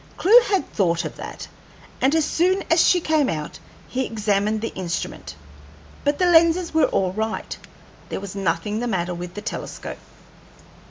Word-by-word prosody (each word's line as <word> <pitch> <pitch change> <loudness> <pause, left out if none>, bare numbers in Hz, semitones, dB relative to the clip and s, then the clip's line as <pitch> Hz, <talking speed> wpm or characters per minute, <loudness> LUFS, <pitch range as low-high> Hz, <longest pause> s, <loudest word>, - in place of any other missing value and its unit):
Clewe 455 +7 +7
had 390 -3 0
thought 170 -4 +1
of - - -6
that, - - -8 0.5
and 275 +4 +3
as 320 -2 +3
soon 370 +5 +1
as 330 0 +5
she 360 - +4
came 310 -4 +1
out 155 -2 -5 0.3
he 260 +1 -2
examined 215 -2 0
the 225 - -4
instrument, 175 -2 -5 0.7
but 290 0 +1
the 365 - +2
lenses 335 0 +4
were 320 - +4
all 185 -1 0
right. 220 +2 -3 0.5
There - - -3
was 195 -1 -7
nothing 195 +3 -1
the 245 - -2
matter 180 -5 -1
with 175 0 -7
the 210 - -6
telescope. - - -6
220 Hz, 165 wpm, -22 LUFS, -, 0.7 s, Clewe